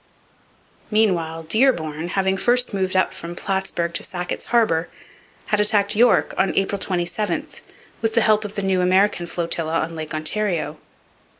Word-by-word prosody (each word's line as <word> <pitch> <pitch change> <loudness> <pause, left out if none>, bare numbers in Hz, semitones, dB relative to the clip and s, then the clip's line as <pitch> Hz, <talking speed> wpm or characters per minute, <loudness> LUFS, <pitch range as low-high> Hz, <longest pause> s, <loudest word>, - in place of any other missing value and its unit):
Meanwhile 170 -7 +1
Dearborn, 165 - +1
having 190 +1 0
first 245 +4 +2
moved 190 -1 -1
up 185 - +2
from 170 +1 -7
Plattsburg 190 -3 -2
to - - 0
Sackett's 180 -2 -5
Harbour, 175 -9 +1 0.6
had 210 - 0
attacked 210 -1 +2
York 235 +2 +4
on 190 - +1
April 195 +1 0
27 180 +3 -2 0.6
with 225 0 -1
the 230 - +5
help 215 0 +3
of 210 0 -7
the 200 - -2
new 190 -1 +1
American 185 -1 +2
flotilla 165 -1 -1
on 165 +1 -4
Lake 155 -1 -5
Ontario. 170 +1 -1
190 Hz, 145 wpm, -22 LUFS, 170-210 Hz, 0.6 s, the